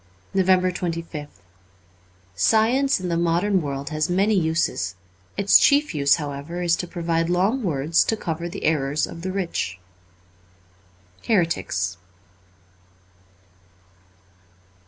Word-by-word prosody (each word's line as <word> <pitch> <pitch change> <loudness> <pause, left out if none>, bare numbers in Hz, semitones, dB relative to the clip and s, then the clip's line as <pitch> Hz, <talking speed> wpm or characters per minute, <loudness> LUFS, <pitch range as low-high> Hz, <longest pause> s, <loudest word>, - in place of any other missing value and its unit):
^ - - -33
364 185 -1 +2
NOVEMBER 165 -2 -5
25th - - -28 0.9
SCIENCE 235 - +2
in 180 - -3
the 170 - 0
modern 175 +3 +1
world 140 0 -5
has 155 +1 -1
many 195 +4 +2
uses; 160 - 0 0.4
its 200 0 +6
chief 290 -2 +3
use, 140 -2 +3
however, 150 +4 -5
is 170 -1 +3
to 180 - -5
provide 165 -1 -1
long 195 +9 +1
words 160 - +1
to 220 - -1
cover 170 -2 -4
the 200 +3 -8
errors 145 -1 +1
of 165 - -10
the 185 +2 -3
rich, 170 - -3 0.8
' 90 0 -28
Heretics.' 95 - 0
170 Hz, 120 wpm, -23 LUFS, 140-185 Hz, 0.9 s, its